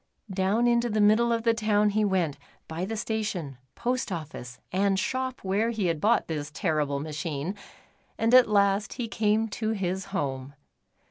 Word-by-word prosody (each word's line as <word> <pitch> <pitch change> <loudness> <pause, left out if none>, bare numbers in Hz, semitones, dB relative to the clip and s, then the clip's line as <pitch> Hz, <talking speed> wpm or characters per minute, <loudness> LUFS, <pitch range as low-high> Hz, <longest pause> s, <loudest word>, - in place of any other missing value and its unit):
Down 195 +5 +1
into 240 0 +2
the 215 0 0
middle 215 +3 +4
of 230 -1 0
the 230 -1 +4
town 210 -2 +2
he 215 +1 +1
went, 185 -7 0 0.3
by 165 +3 -3
the 220 +3 -4
station, 205 - -3 0.2
post 250 -2 -1
office, 150 -7 -6
and 195 +1 +2
shop 260 +5 -2
where 200 +4 +1
he 220 -4 -1
had 165 -3 0
bought 230 +3 +3
this 150 -2 -3
terrible 150 -5 -1
machine, 155 +2 -4 0.6
and 225 +2 +1
at 255 -3 +7
last 200 0 +2
he 240 - -4
came 215 +1 +1
to 220 +1 -2
his 190 -2 -2
home. 140 -7 -4
200 Hz, 170 wpm, -27 LUFS, 165-225 Hz, 0.6 s, at